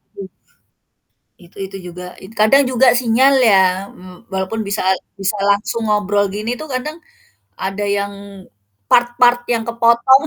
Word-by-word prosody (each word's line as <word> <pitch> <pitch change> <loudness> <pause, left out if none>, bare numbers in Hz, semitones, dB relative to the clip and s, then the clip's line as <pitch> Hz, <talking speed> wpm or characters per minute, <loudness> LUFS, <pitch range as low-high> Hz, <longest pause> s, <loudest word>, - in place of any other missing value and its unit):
m 195 -1 -8 1.1
itu 175 -1 -20
itu 195 0 -9
juga. 180 +1 -10 0.2
Kadang 275 +7 +5
juga 255 +1 +3
sinyal 255 +3 +3
ya 205 -5 +5 0.3
m 180 0 -15
walaupun 190 +4 -3
bisa 200 +1 -2
at 190 - 0 0.2
bisa 195 +2 -1
langsung 210 +3 0
ngobrol 205 -1 +1
gini 215 +4 -3
tuh 310 - -7
kadang 300 +5 -4 0.6
ada 195 +2 -3
yang 200 0 -3 0.8
part-part 240 0 +3
yang 225 -1 -1
kepotong. 235 +3 +4
215 Hz, 135 wpm, -17 LUFS, 195-240 Hz, 1.1 s, Kadang